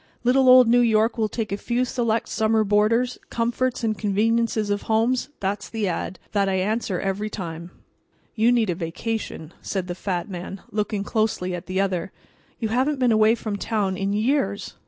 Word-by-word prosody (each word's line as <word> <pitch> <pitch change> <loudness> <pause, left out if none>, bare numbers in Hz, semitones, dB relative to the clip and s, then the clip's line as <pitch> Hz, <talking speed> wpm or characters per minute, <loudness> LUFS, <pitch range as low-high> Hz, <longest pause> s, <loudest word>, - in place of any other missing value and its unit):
Little 255 +1 +4
old 255 -1 +8
New 240 +1 +5
York 225 0 +2
will 215 -1 +1
take 220 -2 -4
a 200 - -1
few 240 +4 0
select 230 -2 -1
summer 220 0 +2
boarders; 215 +4 +2
comforts 240 +2 -1
and 220 -1 +1
conveniences 215 +1 +1
of 205 - 0
homes—that's 220 -3 0
the 220 -3 -2
ad. 180 +1 -3
that 200 -2 +1
I 190 - 0
answer 195 -1 -1
every 195 +2 -2
time." 170 -4 -6 0.6
"You 230 +2 +3
need 230 -6 +2
a - - 0
vacation," 170 0 -4
said 190 -3 -3
the 180 - -4
fat 180 -1 -3
man, 185 0 -7
looking 210 -1 -1
closely 215 -4 -1
at 175 +1 -6
the 185 +1 -1
other. 190 -1 -1 0.5
"You 225 - -2
haven't 265 +6 +1
been 250 -2 +2
away 220 +1 +5
from 215 -3 -4
town 200 -3 -1
in 195 +1 -2
years. 210 -1 0
215 Hz, 175 wpm, -23 LUFS, 195-230 Hz, 0.6 s, old